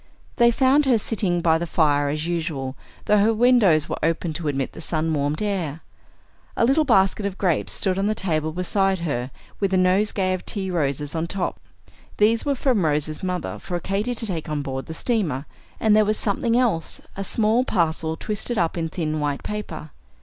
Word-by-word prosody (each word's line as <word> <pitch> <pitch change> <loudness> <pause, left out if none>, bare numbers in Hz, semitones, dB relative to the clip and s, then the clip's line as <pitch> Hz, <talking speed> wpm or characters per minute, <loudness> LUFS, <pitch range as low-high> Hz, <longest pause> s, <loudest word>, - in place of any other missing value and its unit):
They 235 -2 +6
found 265 +4 +3
her 250 -3 +5
sitting 200 -5 -1
by 160 -1 +3
the 170 - -3
fire 145 -3 +2
as 155 +2 -2
usual, 160 -6 -3 0.3
though 210 - +4
her 220 +2 +3
windows 215 - +4
were - - -4
open 165 0 0
to 160 0 -4
admit 135 -2 -1
the - - -10
sun 160 -1 0
warmed 145 +4 -1
air. 170 -7 -2 0.8
A 230 - +4
little 290 +5 +3
basket 195 -5 +3
of 200 -1 -3
grapes 180 -5 0
stood 190 -1 -1
on 200 - +1
the 215 - 0
table 160 -6 -1
beside 190 +3 +1
her, 130 -6 -2 0.3
with 195 -2 +1
a - - +3
nosegay 185 +1 +2
of 185 - -4
tea 190 -3 -3
roses 145 -3 -1
on 165 0 -2
top. 185 +1 -3 0.6
These 220 +2 +3
were 280 - +2
from 245 -7 +1
Rose's 150 0 0
mother, 180 -1 -3
for 175 -2 -4
Katy 200 +7 -2
to 225 - -2
take 170 -7 -3
on 150 -1 -2
board 135 -1 -5
the 160 - -6
steamer; 165 - -1 0.3
and 215 -1 +4
there 215 - +5
was 215 0 0
something 230 +3 +1
else, 225 -10 0
a 195 - -3
small 220 +4 +2
parcel 160 -6 0
twisted 215 +3 -2
up 170 -1 0
in 165 -1 -2
thin 155 -2 -2
white 145 -1 -2
paper. 210 -7 -6
180 Hz, 195 wpm, -23 LUFS, 155-210 Hz, 0.8 s, They